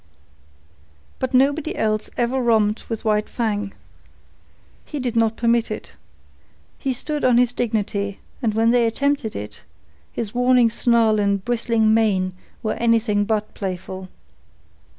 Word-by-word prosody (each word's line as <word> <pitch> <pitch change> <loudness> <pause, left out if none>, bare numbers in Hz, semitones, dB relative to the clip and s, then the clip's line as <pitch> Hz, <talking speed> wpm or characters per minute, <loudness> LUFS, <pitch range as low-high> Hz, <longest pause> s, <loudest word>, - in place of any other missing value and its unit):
But 260 - -2
nobody 285 +6 +2
else 215 -1 -1
ever 245 +2 +1
romped 220 -3 +1
with 225 -1 -4
White 210 -1 +1
Fang. 210 -4 -2 1.1
He 295 - -6
did 245 -3 -2
not 225 -1 +2
permit 235 -1 +2
it. - - -6 0.9
He 270 - -1
stood 295 +4 -3
on 250 -2 +4
his 245 0 +3
dignity, 205 -4 -2 0.2
and 220 -4 0
when 225 +1 +3
they 240 -1 +3
attempted 275 0 -1
it, 105 +1 -7 0.5
his 215 -2 -4
warning 245 -1 +4
snarl 230 -2 +3
and 200 -1 0
bristling 230 -2 +2
mane 195 -5 +2 0.3
were 215 - 0
anything 225 -3 +2
but 215 0 -1
playful. 185 -1 -5
225 Hz, 130 wpm, -22 LUFS, 210-245 Hz, 1.1 s, on